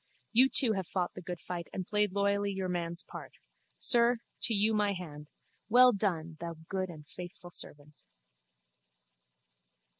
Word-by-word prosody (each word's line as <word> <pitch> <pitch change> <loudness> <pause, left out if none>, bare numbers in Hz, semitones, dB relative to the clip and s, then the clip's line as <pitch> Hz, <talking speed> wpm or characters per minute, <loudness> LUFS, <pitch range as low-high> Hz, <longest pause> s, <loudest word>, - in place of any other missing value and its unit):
You 255 +4 +6
too 240 -5 +4
have 190 -4 -3
fought 180 0 -2
the - - -9
good 175 -1 -6
fight 175 -2 -6
and 185 - -5
played 210 0 +1
loyally 200 +1 0
your 190 -1 -3
man's 170 0 -4
part. - - -10 0.4
Sir, 240 -1 +5 0.2
to - - +3
you 215 +2 +5
my 210 -1 +1
hand. 150 -5 -9 0.4
Well 250 +2 +7
done, 170 -6 -2
thou 170 0 -6
good 190 -1 -2
and 155 -3 -11
faithful 175 +1 -10
servant! 145 -2 -5
185 Hz, 150 wpm, -31 LUFS, 170-210 Hz, 0.4 s, Well